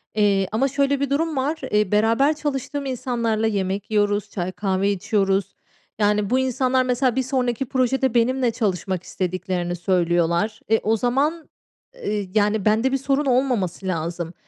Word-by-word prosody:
Eee, 200 Hz, -2 st, +2 dB
ama 235 Hz, +6 st, +1 dB
şöyle 280 Hz, 0 st, +1 dB
bir 280 Hz, -1 st, -1 dB
durum 315 Hz, +2 st, 0 dB
var, 290 Hz, +5 st, 0 dB
eee, 210 Hz, -2 st, +2 dB
beraber 225 Hz, +8 st, +3 dB
çalıştığım 285 Hz, -1 st, -3 dB
insanlarla 235 Hz, -4 st, -1 dB
yemek 200 Hz, -1 st, -2 dB
yiyoruz, 205 Hz, -1 st, +1 dB
çay, 180 Hz, -1 st, -3 dB
kahve 195 Hz, 0 st, 0 dB
içiyoruz. 195 Hz, -1 st, 0 dB, 0.4 s
Yani, 210 Hz, -1 st, +2 dB
bu 255 Hz, -, +2 dB
insanlar, 260 Hz, 0 st, +1 dB
mesela, 250 Hz, 0 st, +1 dB
bir 265 Hz, -, +1 dB
sonraki 255 Hz, -1 st, -1 dB
projede 260 Hz, 0 st, +1 dB
benimle 245 Hz, +1 st, +2 dB
çalışmak 190 Hz, -5 st, -2 dB
istediklerini 180 Hz, -1 st, -3 dB
söylüyorlar, 175 Hz, +3 st, +1 dB
e, 225 Hz, 0 st, +4 dB
o 220 Hz, +1 st, +1 dB
zaman, 285 Hz, +8 st, 0 dB, 0.5 s
eee, 210 Hz, -, -3 dB
yani, 210 Hz, -1 st, +1 dB
bende 225 Hz, +5 st, +3 dB
bir 270 Hz, -, +2 dB
sorun 275 Hz, +2 st, 0 dB
olmaması 245 Hz, -9 st, 0 dB
lazım. 170 Hz, 0 st, -3 dB
220 Hz, 150 wpm, -22 LUFS, 195-260 Hz, 0.5 s, e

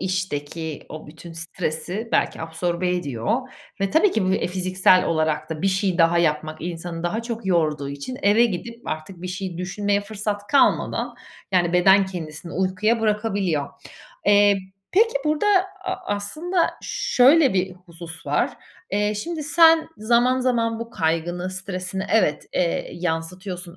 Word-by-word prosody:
işteki 165 Hz, -4 st, -3 dB
o 155 Hz, -1 st, -9 dB
bütün 165 Hz, +2 st, -11 dB
stresi 165 Hz, +5 st, -4 dB
belki -, -, +1 dB
absorbe 170 Hz, +2 st, -2 dB
ediyor 175 Hz, -, -1 dB, 0.4 s
ve 195 Hz, -, 0 dB
tabii 365 Hz, +5 st, +4 dB
ki 215 Hz, -4 st, +1 dB
bu, 185 Hz, -, +2 dB
eee, -, -, 0 dB
fiziksel 185 Hz, 0 st, +3 dB
olarak 155 Hz, -1 st, 0 dB
da 160 Hz, +2 st, -4 dB
bir -, -, +2 dB
şey 190 Hz, -1 st, 0 dB
daha 170 Hz, +1 st, +4 dB
yapmak 155 Hz, -1 st, 0 dB
insanı 170 Hz, -1 st, -5 dB
daha 215 Hz, +7 st, -1 dB
çok 230 Hz, -3 st, -5 dB
yorduğu 155 Hz, -5 st, +1 dB
için 140 Hz, -, -6 dB
eve 210 Hz, +4 st, +5 dB
gidip 230 Hz, +3 st, -4 dB
artık 170 Hz, +3 st, -6 dB
bir 180 Hz, -, -4 dB
şey 180 Hz, -2 st, -5 dB
düşünmeye 200 Hz, +2 st, 0 dB
fırsat 205 Hz, 0 st, -4 dB
kalmadan, 280 Hz, -, +2 dB, 0.4 s
yani, 175 Hz, -2 st, +2 dB
beden 190 Hz, +2 st, +5 dB
kendisini 170 Hz, -2 st, -7 dB
uykuya 190 Hz, +5 st, +1 dB
bırakabiliyor. 200 Hz, -9 st, 0 dB, 0.6 s
Eee, 205 Hz, -1 st, +5 dB, 0.3 s
peki 455 Hz, +5 st, +4 dB
burada 305 Hz, +6 st, +1 dB, 0.4 s
a 370 Hz, -, -1 dB, 0.2 s
aslında 330 Hz, -, -1 dB
şöyle 295 Hz, -, +4 dB
bir 185 Hz, 0 st, 0 dB
husus 170 Hz, -3 st, -12 dB
var. 145 Hz, +1 st, 0 dB, 0.4 s
Eee, 210 Hz, +1 st, +1 dB
şimdi, 315 Hz, +9 st, -4 dB
sen 325 Hz, +1 st, +5 dB
zaman 240 Hz, +4 st, +3 dB
zaman 230 Hz, -3 st, +1 dB
bu 230 Hz, 0 st, -6 dB
kaygını, 175 Hz, +2 st, -1 dB
stresini 185 Hz, 0 st, -4 dB
evet, 185 Hz, -9 st, +2 dB
eee, 170 Hz, -2 st, 0 dB
yansıtıyorsun 175 Hz, +1 st, -4 dB
185 Hz, 145 wpm, -23 LUFS, 170-220 Hz, 0.6 s, eve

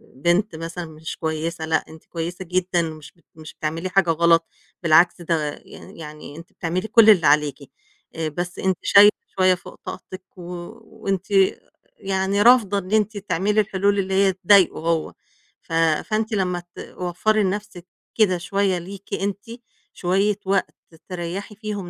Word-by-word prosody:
بنت 175 Hz, +7 st, +1 dB
مثلًا 165 Hz, +2 st, -6 dB
مش 160 Hz, 0 st, -8 dB
كويسة 160 Hz, +1 st, -3 dB
لأ، 160 Hz, 0 st, 0 dB
أنتِ 160 Hz, 0 st, -14 dB
كويسة 170 Hz, +2 st, -5 dB
جدًا 180 Hz, 0 st, 0 dB
مش 155 Hz, -3 st, -7 dB
بت 170 Hz, -, -32 dB
مش 155 Hz, -1 st, -11 dB
بتعملي 165 Hz, +4 st, -4 dB
حاجة 185 Hz, -2 st, +2 dB
غلط 165 Hz, 0 st, +4 dB, 0.4 s
بالعكس، 170 Hz, +2 st, +4 dB
ده 160 Hz, -3 st, -1 dB
يعني -, -, -13 dB
يعني 150 Hz, -2 st, -9 dB
أنتِ 165 Hz, +1 st, -13 dB
بتعملي 180 Hz, +5 st, -3 dB
كل 220 Hz, 0 st, +6 dB
اللي 180 Hz, -8 st, +6 dB
عليكِ. 145 Hz, -1 st, +1 dB, 0.4 s
آآ 160 Hz, -1 st, -2 dB
بس 175 Hz, +3 st, -5 dB
أنتِ 190 Hz, -2 st, 0 dB
شايلة 205 Hz, +1 st, +7 dB, 0.3 s
شوية 185 Hz, -1 st, +4 dB
فوق 180 Hz, -, -13 dB
طاقتِك 185 Hz, 0 st, -8 dB
و -, -, -10 dB, 0.4 s
وأنتِ 195 Hz, -4 st, -4 dB, 0.7 s
يعني 195 Hz, +1 st, -1 dB
رافضة 220 Hz, -4 st, +5 dB
إن 190 Hz, -1 st, -5 dB
أنتِ 215 Hz, -1 st, +1 dB
تعملي 205 Hz, +2 st, +1 dB
الحلول 200 Hz, 0 st, 0 dB
اللي 190 Hz, 0 st, -2 dB
هي 195 Hz, 0 st, +3 dB
تضايقه 190 Hz, 0 st, +4 dB
هو 165 Hz, 0 st, -1 dB, 0.5 s
ف -, -, -10 dB
فأنتِ 190 Hz, +8 st, +1 dB
لمّا 180 Hz, -3 st, -1 dB
توفّري 185 Hz, +5 st, -1 dB
لنَفْسِك 200 Hz, -2 st, -4 dB, 0.3 s
كده 195 Hz, -5 st, +3 dB
شوية 195 Hz, +1 st, 0 dB
ليكِ 195 Hz, +3 st, -9 dB
أنتِ 200 Hz, 0 st, -3 dB, 0.5 s
شوية 195 Hz, +3 st, 0 dB
وقت 195 Hz, 0 st, 0 dB, 0.3 s
تريّحي 180 Hz, +4 st, -5 dB
فيهم 205 Hz, -3 st, -5 dB
185 Hz, 150 wpm, -22 LUFS, 165-200 Hz, 0.7 s, شايلة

